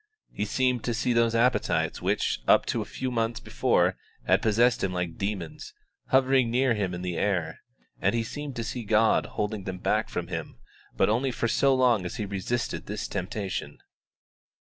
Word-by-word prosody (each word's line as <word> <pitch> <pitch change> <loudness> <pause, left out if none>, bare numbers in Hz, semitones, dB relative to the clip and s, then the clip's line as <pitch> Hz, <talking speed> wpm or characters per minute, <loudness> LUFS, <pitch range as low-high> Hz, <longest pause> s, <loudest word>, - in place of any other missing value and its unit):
He 105 - -2
seemed 125 +2 0
to 120 - 0
see 120 +2 +1
those 115 -1 +2
appetites 120 +2 +1
which, - - 0
up - - +5
to - - -1
a - - -4
few 130 -1 -4
months 115 -1 -1
before, - - +1 0.3
had - - +3
possessed 115 +3 +3
him 95 - 0
like 90 -2 -3
demons, 105 - -4 0.3
hovering 130 -2 +3
near 125 +1 +2
him 95 -4 -2
in 90 - -6
the 90 -2 -3
air, 85 -5 -1 0.4
and - - +2
he 115 - +1
seemed 145 +3 -6
to 115 - -3
see 120 +2 -4
God 110 +1 +3
holding 105 -2 -2
them 95 -1 -4
back - - 0
from - - -4
him, - - -5 0.4
but - - +4
only 120 +5 +1
for 120 -1 -1
so 135 +3 +3
long 125 -6 +3
as 90 - -5
he 110 -3 -3
resisted 100 +5 -3
this 105 +1 -4
temptation. 95 0 -4
115 Hz, 185 wpm, -27 LUFS, 100-125 Hz, 0.4 s, up